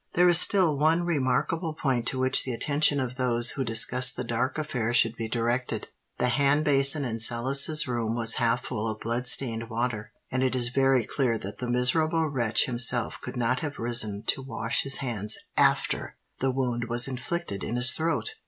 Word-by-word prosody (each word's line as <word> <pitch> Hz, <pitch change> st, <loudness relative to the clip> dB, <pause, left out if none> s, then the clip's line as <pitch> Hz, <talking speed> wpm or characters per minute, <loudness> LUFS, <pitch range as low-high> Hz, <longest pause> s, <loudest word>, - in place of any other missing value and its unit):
There 180 Hz, +1 st, +4 dB
is 175 Hz, -2 st, +6 dB
still 180 Hz, -8 st, +3 dB
one 160 Hz, +3 st, +2 dB
remarkable 155 Hz, +2 st, -1 dB
point 125 Hz, -6 st, -2 dB
to 130 Hz, -, +3 dB
which 130 Hz, 0 st, +2 dB
the 130 Hz, -, -4 dB
attention 145 Hz, +3 st, +2 dB
of 125 Hz, -1 st, -4 dB
those 120 Hz, -2 st, 0 dB
who 135 Hz, -, -3 dB
discuss 125 Hz, +2 st, +2 dB
the -, -, -5 dB
dark 120 Hz, +4 st, -2 dB
affair 125 Hz, -7 st, -3 dB
should 115 Hz, -1 st, +4 dB
be 115 Hz, -1 st, -5 dB
directed:—the 120 Hz, +2 st, -3 dB
hand 140 Hz, +4 st, +1 dB
basin 140 Hz, 0 st, +3 dB
in 115 Hz, -2 st, -4 dB
Sellis's 135 Hz, +7 st, +2 dB
room 115 Hz, -2 st, -2 dB
was 115 Hz, -2 st, +2 dB
half 115 Hz, +2 st, +1 dB
full 110 Hz, -2 st, -4 dB
of 110 Hz, 0 st, -6 dB
blood 120 Hz, +2 st, -3 dB
stained 115 Hz, -3 st, +1 dB
water, 115 Hz, -2 st, -3 dB, 0.2 s
and 130 Hz, -, -1 dB
it 130 Hz, 0 st, 0 dB
is 120 Hz, -2 st, +2 dB
very 135 Hz, -1 st, +2 dB
clear 125 Hz, -5 st, -1 dB
that 100 Hz, -1 st, -9 dB
the 125 Hz, -, -5 dB
miserable 155 Hz, +7 st, +1 dB
wretch 120 Hz, -6 st, +1 dB
himself 120 Hz, -1 st, 0 dB
could -, -, -7 dB
not 125 Hz, +1 st, 0 dB
have 145 Hz, -1 st, -6 dB
risen 110 Hz, -3 st, 0 dB
to -, -, 0 dB
wash 120 Hz, -3 st, -1 dB
his 135 Hz, 0 st, +1 dB
hands 105 Hz, -4 st, -1 dB, 0.2 s
after -, -, 0 dB, 0.2 s
the 135 Hz, -, 0 dB
wound 125 Hz, -2 st, -2 dB
was 120 Hz, +1 st, 0 dB
inflicted 130 Hz, -, -5 dB
in 120 Hz, -, -4 dB
his 125 Hz, +1 st, +4 dB
throat. 165 Hz, -, -2 dB
125 Hz, 190 wpm, -26 LUFS, 120-140 Hz, 0.2 s, is